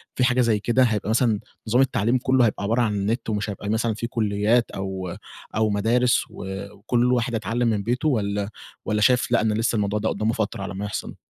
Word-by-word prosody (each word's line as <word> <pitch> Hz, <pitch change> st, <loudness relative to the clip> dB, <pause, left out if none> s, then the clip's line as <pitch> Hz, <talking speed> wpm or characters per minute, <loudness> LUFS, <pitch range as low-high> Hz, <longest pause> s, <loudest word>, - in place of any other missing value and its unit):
في 125 Hz, -, +1 dB
حاجة 125 Hz, 0 st, +3 dB
زي 115 Hz, -3 st, +2 dB
كده، 120 Hz, +5 st, +2 dB
هيبقى 110 Hz, -4 st, 0 dB
مثلًا 110 Hz, -2 st, +2 dB, 0.3 s
نظام 120 Hz, +4 st, +3 dB
التعليم 120 Hz, -2 st, +2 dB
كله 130 Hz, 0 st, +3 dB
هيبقى 105 Hz, -2 st, -1 dB
عبارة 115 Hz, +4 st, +1 dB
عن 110 Hz, -3 st, +1 dB
النت، 105 Hz, +5 st, -1 dB
ومش 105 Hz, 0 st, -1 dB
هيبقى 100 Hz, 0 st, -5 dB
مثلًا 110 Hz, +1 st, +1 dB
في 115 Hz, +2 st, -4 dB
كليات 110 Hz, +1 st, +1 dB
أو 95 Hz, -2 st, -5 dB, 0.4 s
أو 110 Hz, 0 st, +2 dB
مدارس 115 Hz, +4 st, +2 dB
و -, -, -9 dB, 0.3 s
وكل 120 Hz, +5 st, +1 dB
واحد 120 Hz, 0 st, 0 dB
هيتعلم 115 Hz, +3 st, -1 dB
من 105 Hz, -3 st, 0 dB
بيته؟ 125 Hz, +8 st, 0 dB
والّا 100 Hz, -5 st, -1 dB, 0.4 s
والّا 105 Hz, 0 st, 0 dB
شايف 125 Hz, +3 st, +3 dB
لأ، 120 Hz, -, +4 dB
إن 110 Hz, 0 st, +1 dB
لسه 115 Hz, +2 st, 0 dB
الموضوع 105 Hz, 0 st, 0 dB
ده 110 Hz, -, 0 dB
قدامه 110 Hz, +1 st, 0 dB
فترة 105 Hz, -3 st, -2 dB
على 95 Hz, -, -5 dB
ما 100 Hz, +2 st, -4 dB
يحصل؟ 105 Hz, -, -5 dB
110 Hz, 210 wpm, -24 LUFS, 105-120 Hz, 0.4 s, لأ